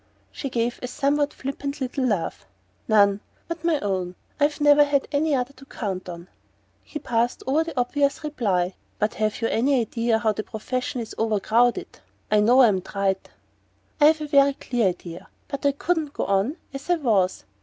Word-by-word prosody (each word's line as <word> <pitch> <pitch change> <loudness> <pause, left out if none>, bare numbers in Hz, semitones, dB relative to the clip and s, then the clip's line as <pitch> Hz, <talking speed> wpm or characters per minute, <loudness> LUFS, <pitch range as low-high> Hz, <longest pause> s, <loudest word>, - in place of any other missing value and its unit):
She 275 - -5
gave 235 -1 -1
a 250 - -3
somewhat 285 +3 0
flippant 280 +1 -5
little 260 0 -2
laugh. 205 - -1 0.4
"None 200 -2 +4 0.3
but 335 -1 -5
my 330 -3 +2
own. 185 -3 -2 0.2
I've 290 0 +1
never 295 0 +6
had 285 -1 +1
any 295 0 +2
other 255 +1 -2
to 275 0 -15
count 190 -5 -5
on." 170 0 -8 0.6
He - - -7
passed 240 -4 -1
over 290 +5 +2
the 330 -6 -4
obvious 280 +4 0
reply. 195 -11 0 0.2
"But 210 +1 0
have 215 +1 -2
you - - +3
any 260 +3 +2
idea 230 0 0
how 220 -1 +1
the 215 - -3
profession 250 +3 -4
is 225 - -7
over 220 -2 +1
crowded? 235 +4 +1 0.3
I 210 - +5
know 245 +5 +6
I'm 200 -6 +3
trite 195 0 -2 0.4
" - - -32
"I've 310 +1 +6
a 300 - -3
very 280 -1 +5
clear 240 -6 0
idea. 175 -2 -5 0.2
But 280 0 -2
I - - +4
couldn't 305 0 -1
go - - -2
on 200 +9 +1 0.2
as 275 +4 -8
I 350 - +5
was." 215 - +1
245 Hz, 185 wpm, -24 LUFS, 210-285 Hz, 0.6 s, never